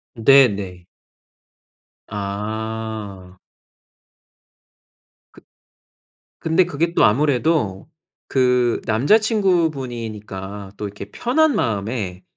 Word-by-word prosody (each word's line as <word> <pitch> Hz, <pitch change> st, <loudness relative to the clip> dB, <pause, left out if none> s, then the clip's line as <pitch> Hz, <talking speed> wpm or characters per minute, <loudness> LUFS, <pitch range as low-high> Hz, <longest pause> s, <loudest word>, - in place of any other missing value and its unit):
네네. 105 Hz, -8 st, +3 dB, 1.2 s
아. 105 Hz, -2 st, -5 dB, 2.0 s
그 -, -, -17 dB, 1.0 s
근데 165 Hz, +3 st, +2 dB
그게 170 Hz, 0 st, -1 dB
또 -, -, +4 dB
아무래도 130 Hz, -, +1 dB, 0.4 s
그 125 Hz, -2 st, +2 dB
남자 125 Hz, -, +4 dB
친구분이니까 120 Hz, -, -2 dB
또 105 Hz, -, -4 dB
이렇게 100 Hz, 0 st, -9 dB
편한 300 Hz, -, +1 dB
마음에 100 Hz, -4 st, -2 dB
110 Hz, 150 characters per minute, -21 LUFS, 100-145 Hz, 2.0 s, 또